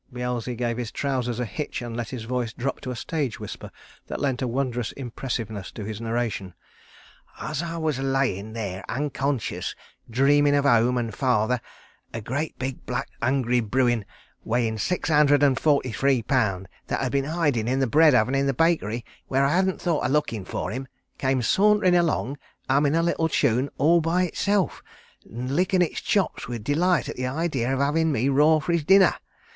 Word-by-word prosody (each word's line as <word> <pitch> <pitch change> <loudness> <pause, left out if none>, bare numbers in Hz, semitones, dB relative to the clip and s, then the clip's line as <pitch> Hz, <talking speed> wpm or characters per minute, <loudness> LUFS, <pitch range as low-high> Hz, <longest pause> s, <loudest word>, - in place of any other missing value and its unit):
Beelzy 125 0 -3
gave 120 -1 -2
his 120 -3 -4
trousers 125 -4 -2
a 125 - -1
hitch 120 +8 -4
and 120 -1 -6
let 120 -1 -4
his 125 -4 -6
voice 120 -1 -2
drop 135 +3 -3
to 130 - -6
a 125 - -3
stage 140 0 -3
whisper - - -7 0.4
that - - -4
lent 135 -3 -1
a 130 - 0
wondrous 125 -2 -2
impressiveness 115 -6 -5
to 110 - -6
his 110 +1 -6
narration. 115 -5 -2 0.8
"As 155 0 -3
I 170 -1 -4
was 155 -5 -1
a - - -3
layin' 130 -6 -1
there 100 -4 -4
unconscious, 140 -2 -2 0.3
dreamin' 145 +4 +4
of 145 0 +2
home 120 -1 +4
and 115 -2 -2
father, 125 -2 +1 0.5
a - - -2
great 140 +8 -3
big 130 0 -4
black 125 +2 -2
hungry 125 -1 +2
bruin 120 0 +1 0.4
weighin' 115 -1 0
six 180 - -1
hundred 145 -2 +4
and 135 -2 +3
forty 140 -5 +2
three 135 0 +1
pounds, 105 -7 0 0.2
that - - -1
had 130 -2 -1
been 140 -1 +1
hidin' 145 -8 0
in 130 +2 +1
the 135 - +3
bread 150 +3 +5
oven 125 +2 +3
in 135 0 +2
the 135 - 0
bakery, 120 -8 +1 0.2
where 135 +1 +2
I 140 - +2
hadn't 190 0 +1
thought 170 -4 0
of - - +1
lookin' 125 -9 0
for - - -4
him, 130 +4 -5 0.3
came 130 -2 +1
saunterin' 205 - +4
along, 160 -5 +1 0.3
hummin' 140 +3 +3
a 165 - +2
little 165 -1 +1
tune 130 -2 +1
all 170 +4 +4
by 170 +3 +1
himself, 195 +1 0 0.5
and 125 +4 -4
lickin' 185 +2 +2
his 175 - 0
chops 200 -5 0
with 120 -3 -5
delight 165 +6 +2
at - - -6
the 125 0 -2
idee 150 0 -1
of 135 +2 0
havin' 155 +4 +2
me 130 0 +1
raw 150 +3 +5
for 155 - -2
his 170 -2 +1
dinner. 190 +4 +6
135 Hz, 190 wpm, -25 LUFS, 120-150 Hz, 0.8 s, dinner